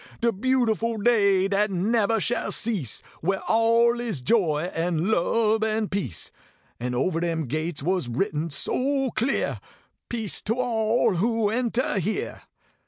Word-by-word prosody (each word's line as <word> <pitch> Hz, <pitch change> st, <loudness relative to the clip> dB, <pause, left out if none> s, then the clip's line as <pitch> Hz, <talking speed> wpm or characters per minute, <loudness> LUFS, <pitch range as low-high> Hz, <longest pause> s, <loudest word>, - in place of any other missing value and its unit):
De 235 Hz, 0 st, +2 dB
beautiful 230 Hz, 0 st, +1 dB
day 200 Hz, -4 st, +3 dB
dat 205 Hz, +2 st, +1 dB
nebber 215 Hz, +4 st, +1 dB
shall 240 Hz, +4 st, -1 dB
cease, 200 Hz, -, -1 dB, 0.2 s
Where 190 Hz, +4 st, 0 dB
all 230 Hz, +1 st, +3 dB
is 220 Hz, -, -3 dB
joy, 170 Hz, -, +1 dB
an 170 Hz, +3 st, 0 dB
lub, 220 Hz, +3 st, +2 dB
an 215 Hz, -1 st, 0 dB
peace. 130 Hz, -, -3 dB, 0.5 s
And 125 Hz, +1 st, -3 dB
ovah 165 Hz, +7 st, 0 dB
dem 165 Hz, -2 st, -1 dB
gates 155 Hz, +3 st, -3 dB
was 180 Hz, -6 st, 0 dB
written 155 Hz, -, -1 dB
so 270 Hz, -, -1 dB
clear: 245 Hz, +6 st, -1 dB, 0.5 s
Peace 225 Hz, -4 st, -1 dB
to 225 Hz, -, -1 dB
all 230 Hz, -4 st, +1 dB
who 225 Hz, +2 st, +1 dB
entah 235 Hz, -2 st, 0 dB
here." 200 Hz, +5 st, -3 dB
210 Hz, 135 wpm, -25 LUFS, 175-230 Hz, 0.5 s, day